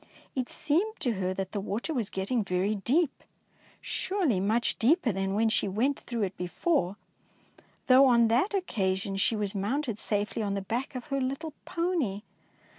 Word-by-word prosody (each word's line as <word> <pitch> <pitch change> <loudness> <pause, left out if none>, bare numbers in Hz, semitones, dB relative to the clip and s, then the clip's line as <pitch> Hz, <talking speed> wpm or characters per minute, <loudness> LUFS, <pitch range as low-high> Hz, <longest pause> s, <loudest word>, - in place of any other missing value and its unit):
It 255 -2 -2
seemed 390 +10 0
to 255 -6 +1
her 190 -3 -1
that 190 0 -4
the 205 - -2
water 215 +10 -3
was 235 -8 -1
getting 205 +5 -1
very 190 +2 0
deep, 275 - 0 0.6
surely 360 - 0
much 220 +5 +1
deeper 270 +1 +3
than 195 0 -1
when 225 +2 +3
she 220 - +2
went 240 +9 0
through 235 -3 -3
it 195 -1 -2
before, 180 - 0 0.9
though 265 +1 +7
on 235 -2 +5
that 275 - +2
occasion 195 - -1
she 195 +3 +2
was 205 -2 -2
mounted 220 +3 -1
safely 210 +2 -1
on 200 -2 -1
the 200 - -2
back 240 +7 -3
of 250 - -5
her 275 -1 0
little 275 +4 -3
pony. 335 - -1
230 Hz, 170 wpm, -29 LUFS, 195-275 Hz, 0.9 s, though